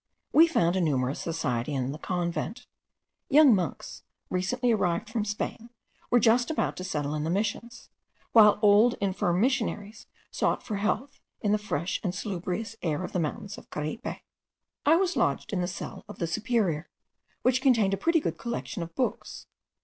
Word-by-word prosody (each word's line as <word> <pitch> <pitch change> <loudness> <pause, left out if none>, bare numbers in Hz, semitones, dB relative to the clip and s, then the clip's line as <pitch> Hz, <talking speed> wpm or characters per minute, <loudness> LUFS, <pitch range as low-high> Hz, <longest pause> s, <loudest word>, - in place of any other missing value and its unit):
We 325 +2 +8
found 175 - +2
a 190 - +1
numerous 135 -4 0
society 145 -5 -2
in 130 0 -1
the 150 - -7
convent. 180 +8 -3 0.6
Young 290 -2 +7
monks, 180 -8 -3 0.3
recently 240 +7 0
arrived 195 -1 0
from 225 -2 -1
Spain, 215 +2 -4 0.4
were 245 - +5
just 235 +2 +3
about 315 - -1
to 185 - -5
settle 150 -5 -2
in 150 -1 -2
the 160 - -2
Missions, 215 +5 -3 0.4
while 210 -3 +7
old 210 +4 +6
infirm 185 -3 0
missionaries 225 -3 -1 0.2
sought - - 0
for 210 - -3
health 220 +7 -2 0.2
in 205 - +1
the 210 - +2
fresh 175 -4 -2
and 185 -2 -2
salubrious 195 +2 -4
air 155 -1 -1
of - - -5
the 180 - -1
mountains 200 +6 -4
of - - -19
Caripe. 155 - -5 0.7
I 315 - +7
was 370 +1 +1
lodged - - 0
in 185 - 0
the 175 - -1
cell 175 - -7
of - - -9
the 170 - -1
superior, 195 -4 -1 0.5
which 255 +1 +3
contained 230 -8 +3
a - - +3
pretty 335 - +2
good 165 - -3
collection 235 -4 -4
of 165 0 -7
books. 255 - -3
205 Hz, 170 wpm, -28 LUFS, 170-235 Hz, 0.7 s, We